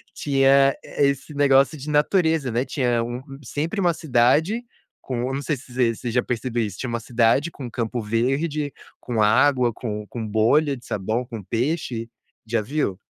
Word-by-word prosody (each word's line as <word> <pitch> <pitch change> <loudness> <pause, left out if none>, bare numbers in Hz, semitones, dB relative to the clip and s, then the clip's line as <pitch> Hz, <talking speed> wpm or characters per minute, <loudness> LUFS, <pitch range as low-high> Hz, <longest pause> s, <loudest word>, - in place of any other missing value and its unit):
tinha 135 -1 +4
esse 140 +1 -1
negócio 140 +1 +4
de 145 +2 -7
natureza, 160 -2 +2
né. 120 +3 0
Tinha 120 -5 0
um 120 +2 -5 0.2
sempre 155 - -3
uma 175 -2 +3
cidade 155 - +2 0.4
com 125 -2 -4
eu - - -3
não 140 - -3
sei 150 - 0
se 125 0 -15
você 120 -2 +2
você 120 - -5
já 125 +2 +1
percebeu 120 0 -2
isso, 100 -3 -7
tinha 130 - -3
uma 115 0 -2
cidade 120 +6 +2
com 135 - -8
um - - -5
campo 120 +1 -3
verde, 135 +7 -1 0.3
com 115 -3 -2
água, 125 +3 +4
com 105 -2 -5
com 115 0 -5
bolha 135 +8 +3
de 120 - -16
sabão, 110 +5 -2
com 115 -4 -8
peixe. 120 - -2 0.4
Já 115 +1 +1
viu? 105 -5 -2
125 Hz, 180 wpm, -23 LUFS, 115-145 Hz, 0.4 s, tinha